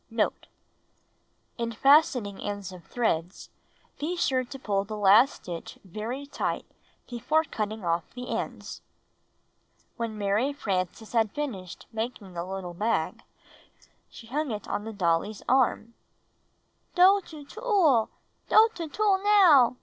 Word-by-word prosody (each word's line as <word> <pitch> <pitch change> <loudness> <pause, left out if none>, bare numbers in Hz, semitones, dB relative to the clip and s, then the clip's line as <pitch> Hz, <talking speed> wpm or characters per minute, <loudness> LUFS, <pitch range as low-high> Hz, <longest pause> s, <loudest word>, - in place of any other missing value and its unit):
Note. 225 -2 -1 0.6
— - - -44
In 230 0 -2
fastening 250 -6 +3
ends 205 -2 -5
of 180 -2 -11
threads, 180 -7 -2 0.5
be 325 +5 -2
sure 260 -6 +1
to 270 +3 -9
pull 200 -6 -1
the 215 +1 -6
last 210 +6 +5
stitch 170 -2 -7
very 220 +9 -5
tight 285 - -3 0.4
before 300 +7 +1
cutting 215 - -4
off 170 -1 -1
the 250 0 -7
ends. - - -5 1.2
When 230 -2 -4
Alary 210 +8 0
Frances 195 - -3
had 225 -3 +2
finished 205 -12 -5
making 220 -4 -5
the 170 0 -4
little 185 -1 -6
bag, 215 +6 -1 0.9
she - - -13
hung 290 +5 -2
it 210 -3 -5
on 205 - -3
the 225 - -5
dolly's 195 +1 -1
arm. 245 -3 +2 1.0
''Doe 380 +2 +6
to 300 -3 -11
tool! 350 - +2 0.4
Doe 445 +1 +7
to 335 -6 -5
tool, 400 +3 +1
now!" 350 - +6
230 Hz, 135 wpm, -27 LUFS, 200-285 Hz, 1.2 s, Doe